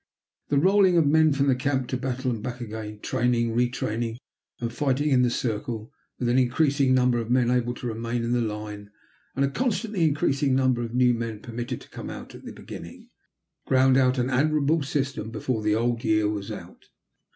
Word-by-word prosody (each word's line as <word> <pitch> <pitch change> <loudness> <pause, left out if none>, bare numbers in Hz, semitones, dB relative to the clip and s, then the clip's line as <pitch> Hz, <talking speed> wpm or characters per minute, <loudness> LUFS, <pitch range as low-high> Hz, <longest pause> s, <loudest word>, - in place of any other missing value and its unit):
The 145 - +2
rolling 190 +3 +4
of 165 - +4
men 155 +2 +4
from 140 -1 +2
camp 135 -2 0
to - - -1
battle 130 0 -2
and 115 -3 -4
back 125 +2 -5
again, 105 -2 -7
training, 120 -1 0
retraining, 120 -1 -1 0.4
and 115 -1 -3
fighting 145 +2 0
in 130 -3 +4
the 125 - +3
circle, 115 -1 -3 0.3
with 125 - -2
an 120 +2 +3
increasing 135 +1 +2
number 125 -1 +3
of 115 -1 -4
men 125 -1 +3
able 120 -1 0
to - - -8
remain 115 +1 -2
in 115 - -1
the 120 0 +2
line, 105 -2 -5 0.5
and 135 +1 +2
a 140 - -2
constantly 220 - -1
increasing 145 -3 +2
number 130 -2 +2
of 120 0 -5
new 125 -1 +4
men 115 -2 -4
permitted 120 +2 -5
to - - -15
come - - -7
in - - -6
at - - -11
the - - -8
beginning, - - -10 0.6
ground 130 0 +4
out 130 0 +3
an 125 +1 0
admirable 150 +3 +2
system 135 -5 -2
before 120 -1 -2
the 105 0 +1
old 115 +1 0
year 110 -1 +2
was 105 -2 -3
out. - - -10
125 Hz, 195 wpm, -25 LUFS, 115-140 Hz, 0.6 s, rolling